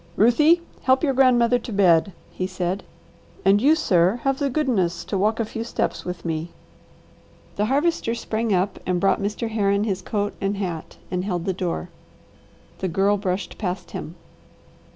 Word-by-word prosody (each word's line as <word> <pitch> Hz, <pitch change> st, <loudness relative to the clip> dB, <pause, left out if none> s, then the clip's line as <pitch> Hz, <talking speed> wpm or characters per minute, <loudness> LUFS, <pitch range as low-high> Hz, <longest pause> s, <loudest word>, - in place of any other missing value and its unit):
"Ruthie, 300 Hz, -, +4 dB, 0.2 s
help 260 Hz, +2 st, +3 dB
your 280 Hz, -3 st, +2 dB
grandmother 245 Hz, -2 st, +4 dB
to 235 Hz, -, -8 dB
bed," 190 Hz, -2 st, +4 dB, 0.2 s
he 185 Hz, -, -3 dB
said. 185 Hz, +1 st, -3 dB, 0.6 s
"And 200 Hz, +2 st, +5 dB
you, 295 Hz, +5 st, +5 dB
sir, 190 Hz, -, +2 dB
have 270 Hz, -1 st, +1 dB
the 285 Hz, -1 st, +1 dB
goodness 225 Hz, -, 0 dB
to -, -, -3 dB
walk 215 Hz, +4 st, +1 dB
a 230 Hz, -, +1 dB
few 225 Hz, +1 st, -5 dB
steps 235 Hz, -, -2 dB
with 180 Hz, -1 st, -6 dB
me." 165 Hz, 0 st, -2 dB, 1.1 s
The 210 Hz, -, +1 dB
Harvester 275 Hz, -1 st, +1 dB
sprang 225 Hz, -1 st, -2 dB
up 190 Hz, +1 st, 0 dB
and 180 Hz, -1 st, +1 dB
brought 195 Hz, +2 st, +2 dB
Mr. 210 Hz, +3 st, -2 dB
Herron 200 Hz, -2 st, +1 dB
his 195 Hz, -3 st, -1 dB
coat 205 Hz, +2 st, -2 dB
and 195 Hz, +1 st, -1 dB
hat 175 Hz, -5 st, -5 dB
and 180 Hz, 0 st, -1 dB
held 180 Hz, -3 st, -2 dB
the 190 Hz, -, 0 dB
door. 175 Hz, -, -3 dB, 0.9 s
The 190 Hz, -, -1 dB
Girl 195 Hz, +4 st, +2 dB
brushed 190 Hz, -2 st, -3 dB
past 180 Hz, -3 st, -4 dB
him. 165 Hz, -, -6 dB
200 Hz, 170 wpm, -23 LUFS, 185-235 Hz, 1.1 s, And